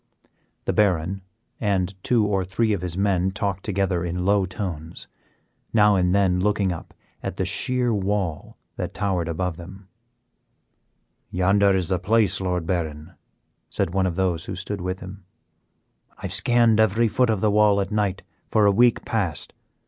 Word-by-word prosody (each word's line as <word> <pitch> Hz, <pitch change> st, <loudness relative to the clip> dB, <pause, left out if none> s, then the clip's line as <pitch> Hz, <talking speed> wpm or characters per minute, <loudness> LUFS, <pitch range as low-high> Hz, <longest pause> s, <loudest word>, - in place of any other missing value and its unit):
The -, -, 0 dB
Baron 95 Hz, -2 st, +1 dB, 0.4 s
and 95 Hz, -2 st, 0 dB
two 115 Hz, -4 st, +2 dB
or 100 Hz, -2 st, 0 dB
three 105 Hz, +4 st, 0 dB
of 100 Hz, -, -2 dB
his 90 Hz, -1 st, -4 dB
men 95 Hz, -2 st, +1 dB
talked 100 Hz, -1 st, -3 dB
together 95 Hz, -3 st, 0 dB
in 90 Hz, +1 st, -3 dB
low 100 Hz, -1 st, +3 dB
tones, 85 Hz, -4 st, -6 dB, 0.7 s
now 105 Hz, -2 st, +5 dB
and 90 Hz, 0 st, +2 dB
then 95 Hz, -3 st, +2 dB
looking 100 Hz, -1 st, +1 dB
up 85 Hz, -, -8 dB, 0.3 s
at -, -, -5 dB
the -, -, 0 dB
sheer 125 Hz, -2 st, 0 dB
wall 95 Hz, -5 st, -2 dB, 0.2 s
that -, -, -4 dB
towered 95 Hz, -5 st, -1 dB
above 85 Hz, 0 st, -2 dB
them. 95 Hz, +2 st, -11 dB, 1.4 s
"Yonder 95 Hz, +2 st, +3 dB
is 95 Hz, -2 st, -1 dB
the 95 Hz, -2 st, +1 dB
place, 100 Hz, 0 st, +2 dB
Lord 90 Hz, -3 st, -1 dB
Baron," 80 Hz, -1 st, -3 dB, 0.6 s
said 85 Hz, -, -1 dB
one 95 Hz, -1 st, +2 dB
of 85 Hz, -, -2 dB
those 90 Hz, -3 st, 0 dB
who 95 Hz, -, -5 dB
stood 100 Hz, +1 st, -5 dB
with 90 Hz, +1 st, -4 dB
him. 95 Hz, +1 st, -9 dB, 0.9 s
"I -, -, -17 dB
have -, -, -3 dB
scanned 120 Hz, -2 st, +3 dB
every 110 Hz, +2 st, +3 dB
foot 125 Hz, +3 st, +1 dB
of 110 Hz, -3 st, +1 dB
the 105 Hz, -, +3 dB
wall 105 Hz, -1 st, +4 dB
at 100 Hz, +1 st, -2 dB
night 105 Hz, -3 st, -1 dB, 0.3 s
for 105 Hz, -1 st, +3 dB
a 100 Hz, -, +6 dB
week 120 Hz, +3 st, +3 dB
past. 100 Hz, -10 st, -2 dB
95 Hz, 165 wpm, -23 LUFS, 90-105 Hz, 1.4 s, a